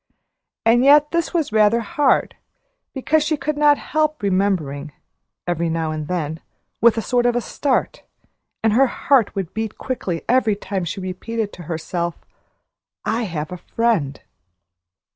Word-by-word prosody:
And 235 +2 +5
yet 295 +2 +6
this 335 -1 0
was 325 -8 -1
rather 215 +2 +4
hard, 295 0 +1 0.6
because 295 +4 +1
she 310 0 0
could 305 +1 -2
not 295 -1 +4
help 310 -5 -1
remembering, 180 -7 0 0.5
every 170 -1 -1
now 160 -1 -1
and 155 -1 -4
then, 160 -3 -3 0.4
with 230 0 +5
a 225 - -1
sort 245 -1 +2
of 240 -1 +1
start, 275 -3 -1 0.6
and 220 -1 +3
her 270 +4 +5
heart 255 -2 +2
would 190 -4 -4
beat 220 -1 -4
quickly 190 -10 -3
every 235 -4 +3
time 195 -2 -4
she 185 +4 -4
repeated 205 +4 -4
to - - -10
herself, 170 +1 -3 0.9
"I 225 +2 0
have 155 -4 -4
a 180 - -5
friend!" 180 -9 -1
220 Hz, 145 wpm, -21 LUFS, 175-260 Hz, 0.9 s, yet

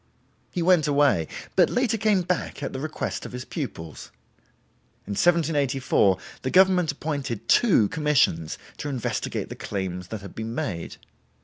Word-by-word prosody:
He 175 - -2
went 175 -4 +4
away, 140 - +3 0.3
but - - +5
later 245 -2 +1
came 210 -4 +2
back 175 -4 -2
at - - -3
the 130 - -4
request 155 +2 -4
of - - -8
his 125 0 -6
pupils. 95 - -6 1.0
In 100 - -7
1784 140 - +2 0.2
the 130 - -2
government 185 -1 +4
appointed 140 -6 -4
two 180 - +5
commissions 145 - +1 0.2
to 145 - -4
investigate 130 -4 -3
the - - -6
claims 90 -3 -4
that 110 +1 -6
had 100 - -10
been 110 +1 -5
made. 85 -9 -4
140 Hz, 145 wpm, -25 LUFS, 105-170 Hz, 1.0 s, but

